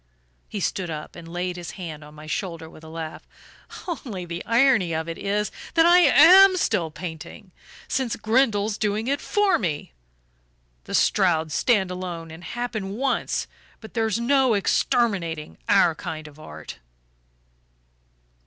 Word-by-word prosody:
He 210 - -4
stood 185 -1 -2
up 155 -1 -7
and 170 -1 -10
laid 175 +1 -4
his 175 -2 -7
hand 160 -5 -7
on 150 +1 -14
my 155 0 -11
shoulder 165 +1 -4
with 160 - -15
a - - -11
laugh. 160 -1 -6 0.7
"Only 230 - -5
the 170 0 -6
irony 230 -8 +3
of 160 0 -3
it 165 - -6
is 205 +1 -1 0.2
that 330 0 +5
I 350 +1 +7
AM 370 +3 +7
still 205 - 0
painting 170 +4 -9 0.4
since 260 -4 -1
Grindle's 220 -3 +1
doing 215 +2 -1
it 280 +1 0
for 410 -2 +2
me! 155 - -3 0.9
The - - -3
Strouds 165 -6 +2
stand 195 - +2
alone, 175 -3 -6
and 165 +2 -11
happen 215 -2 -4
once 270 +1 -1 0.3
but 220 - -12
there's 225 -2 0
no 260 -1 +3
exterminating 190 -6 0
our 180 -4 +5
kind 155 -1 -7
of 150 0 -15
art." 75 - -10
190 Hz, 145 wpm, -24 LUFS, 165-235 Hz, 0.9 s, I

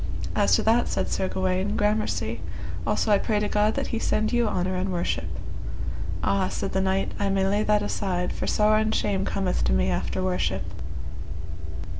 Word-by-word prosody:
As - - +4
to - - +1
that, 230 +2 +4
said - - -1
Sir 190 - +1
Gawaine, 185 +3 0
gramercy; 210 +1 0 0.5
also 215 - +2
I 200 - +6
pray 215 -3 +1
to 210 - 0
God 210 +1 +2
that 275 - 0
he 230 - +1
send 215 0 +1
you 240 -1 +3
honour 185 -2 0
and 185 +1 -1
worship. 175 -1 -1 1.0
Ah, 195 -1 +2
said 195 - -3
the 190 - +1
knight, 190 0 +1
I 200 - +1
may 195 0 +2
lay 200 +2 +2
that 210 -1 +3
aside, 180 -3 -1
for - - -3
sorrow 215 0 +4
and 220 0 +1
shame 195 -2 +1
cometh 190 -2 0
to 65 - +3
me 65 -1 +2
after - - -1
worship. 90 -3 0
195 Hz, 185 wpm, -26 LUFS, 185-215 Hz, 1.0 s, I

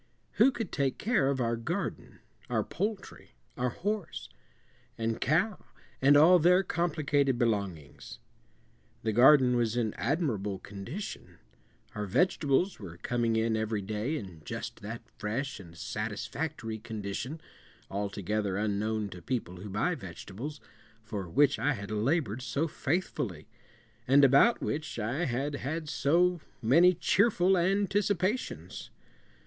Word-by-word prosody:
Who 240 +6 +6
could 225 -7 -5
take 140 -2 0
care 210 - +2
of 140 -1 0
our 115 -1 +1
garden, 170 +12 -4 0.3
our - - +1
poultry, 205 -2 -5 0.2
our 125 0 0
horse, 200 - -4 0.7
and 115 0 -2
cow, 180 - +1 0.4
and 140 +2 +6
all 175 +5 +7
their 180 +4 +5
complicated 150 -6 +1
belongings? 100 - -2 0.9
The 110 - +1
garden 125 +1 +6
was 120 -1 +1
in 110 -3 0
admirable 115 - -1
condition. 105 - -7 0.6
Our 105 -1 -4
vegetables 165 - +2
were 85 -5 -9
coming 115 +3 0
in 110 0 +1
every 110 -2 -1
day 110 +9 -2
in 95 - -9
just - - -6
that 110 +3 -6 0.2
fresh 115 +6 -3
and 85 -3 -13
satisfactory 115 - -4
condition 110 +7 -5 0.5
altogether 100 0 -2
unknown 105 0 -1
to 90 -2 -10
people 90 -4 -3
who 100 +3 -8
buy 105 - 0
vegetables 120 - -7 0.4
for 105 -5 -5
which 145 - +3
I 145 - +2
had 105 -3 -7
labored 115 +1 0
so 135 +6 -1
faithfully, 130 - -2 0.6
and 140 +2 +7
about 140 - +5
which 150 -3 -3
I 120 +10 -1
had 140 +2 -2
had 155 +4 -4
so 170 +4 +2 0.2
many 165 +10 +5
cheerful 195 0 +3
anticipations. 200 +3 0
130 Hz, 125 wpm, -30 LUFS, 105-165 Hz, 0.9 s, all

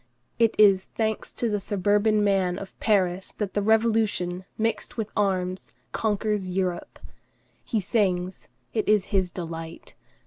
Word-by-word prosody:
It 230 -1 +3
is, 195 -3 +6
thanks 220 -1 -2
to 240 - 0
the 210 -2 0
suburban 205 +2 +2
man 190 -3 +2
of 195 - -8
Paris, 190 -3 +1
that 205 -3 -4
the 205 - +1
Revolution, 215 -4 +1
mixed 225 +2 -2
with 220 -2 -3
arms, 185 -4 -1 0.2
conquers 210 -3 -1
Europe. 180 -1 -2 0.7
He 225 - -1
sings; 185 -3 -1 0.3
it 215 - 0
is 210 -2 +4
his 190 -2 +2
delight. 165 -2 -7
200 Hz, 135 wpm, -26 LUFS, 185-215 Hz, 0.7 s, is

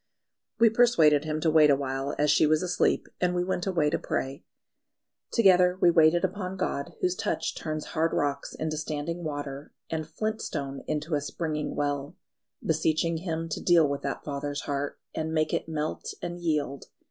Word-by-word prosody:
We 230 -1 +5
persuaded 165 -11 +4
him 155 0 -2
to 160 - +2
wait 155 -1 +6
awhile 135 0 0
as 150 0 +3
she 155 - +4
was 155 +2 +2
asleep, 180 0 +1
and 180 0 +1
we 175 - +1
went 180 0 -2
away 165 -6 +2
to - - 0
pray. 135 +1 -3 0.9
Together 180 -5 +5
we 175 - +5
waited 165 +2 +5
upon 190 0 -4
God, 140 -6 -2
whose 180 -1 +2
touch 215 +2 -2
turns 155 -1 -4
hard 165 0 +1
rocks 145 -1 -1
into 155 -1 -3
standing 155 +3 -3
water, 145 -2 -5 0.2
and 155 -1 -2
flint 215 +6 -3
stone 140 -1 -4
into 155 +2 -2
a 145 - +1
springing 150 0 -3
well, 145 +2 -2 0.5
beseeching 160 +1 +1
Him 165 -1 -3
to 155 - -3
deal 170 -3 +5
with 140 0 -3
that 140 - -4
father's 145 0 -3
heart, 140 0 -3 0.2
and 160 0 -3
make 155 0 +1
it - - -1
melt 155 -1 -3
and 175 0 -5
yield. 150 -5 -1
155 Hz, 175 wpm, -27 LUFS, 145-175 Hz, 0.9 s, wait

